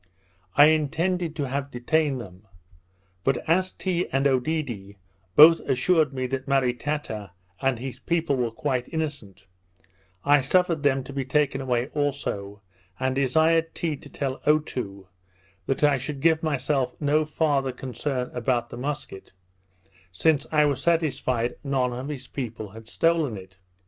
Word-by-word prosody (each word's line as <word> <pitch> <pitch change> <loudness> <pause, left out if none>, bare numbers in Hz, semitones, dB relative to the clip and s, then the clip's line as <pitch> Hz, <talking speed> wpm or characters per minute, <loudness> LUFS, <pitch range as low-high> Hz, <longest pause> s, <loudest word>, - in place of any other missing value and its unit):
I 145 - +9
intended 160 +3 +1
to 145 -3 -2
have 140 +2 -3
detained 140 +2 0
them; 95 -2 -11 0.8
but 135 -2 0
as 185 +3 +3
Tee 180 -2 -2
and 135 +1 +1
Oedidee 130 -7 -1 0.4
both 165 +2 +9
assured 145 +3 +2
me 130 -1 -3
that 130 +1 -4
Maritata 130 -6 -1 0.3
and 135 -2 +1
his 130 +2 -6
people 165 -4 0
were 125 -2 0
quite 125 +1 -2
innocent, 145 - -5 0.8
I 145 0 +5
suffered 170 +3 +2
them 135 -2 +2
to 140 - -9
be 135 -1 -2
taken 135 0 +1
away 125 0 0
also, 105 -9 -3 0.4
and 130 0 0
desired 160 +5 +2
Tee 160 -3 -1
to 145 - -14
tell 135 -2 -4
Otoo, 125 -10 0 0.6
that 135 - -1
I 145 -2 +4
should 140 +2 -5
give 160 +2 +3
myself 135 -4 0
no 150 +1 +2
farther 150 -3 0
concern 125 +1 -4
about 120 -1 -1
the - - -7
musket, 140 -8 -5 0.8
since 145 - +2
I 150 -1 +4
was 140 -2 0
satisfied 140 -8 0
none 130 -3 0
of 125 +3 -5
his 140 -3 -6
people 115 -6 -6
had 110 +1 -12
stolen 160 -5 +1
it. 95 -1 -12
135 Hz, 145 wpm, -25 LUFS, 125-155 Hz, 0.8 s, I